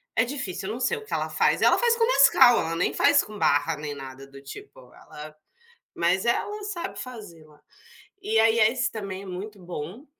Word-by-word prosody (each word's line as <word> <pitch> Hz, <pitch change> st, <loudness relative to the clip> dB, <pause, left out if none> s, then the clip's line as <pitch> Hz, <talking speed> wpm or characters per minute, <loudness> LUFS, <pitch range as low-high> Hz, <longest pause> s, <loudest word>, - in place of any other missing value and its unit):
é 225 Hz, -, +3 dB
difícil, 205 Hz, -8 st, -5 dB
não 225 Hz, +3 st, -5 dB
sei 255 Hz, -, 0 dB
o 445 Hz, -, -11 dB
que -, -, -8 dB
ela -, -, -2 dB
faz, -, -, +1 dB
ela -, -, +5 dB
faz 475 Hz, -1 st, +3 dB
com 460 Hz, -, +3 dB
Nescau, 275 Hz, -, +6 dB
ela 165 Hz, +1 st, -3 dB
nem 165 Hz, -, 0 dB
faz 285 Hz, 0 st, +4 dB
com 210 Hz, -1 st, -11 dB
barra 145 Hz, +3 st, +1 dB
nem 150 Hz, -1 st, -6 dB
nada 135 Hz, 0 st, -10 dB
do 140 Hz, 0 st, -14 dB
tipo, 415 Hz, -, -13 dB
ela, 150 Hz, 0 st, -12 dB, 0.6 s
mas 175 Hz, +3 st, 0 dB
ela 415 Hz, -, -1 dB
sabe 345 Hz, -, -6 dB
fazer 210 Hz, -10 st, -10 dB
lá. 150 Hz, -1 st, -22 dB, 0.6 s
E 430 Hz, +3 st, -1 dB
aí 225 Hz, +1 st, +3 dB
a 215 Hz, -1 st, +5 dB
esse 255 Hz, +1 st, -2 dB
também 195 Hz, -3 st, -6 dB
é -, -, -11 dB
muito 195 Hz, +3 st, -8 dB
bom, 175 Hz, -, -8 dB
210 Hz, 205 wpm, -25 LUFS, 165-270 Hz, 0.6 s, Nescau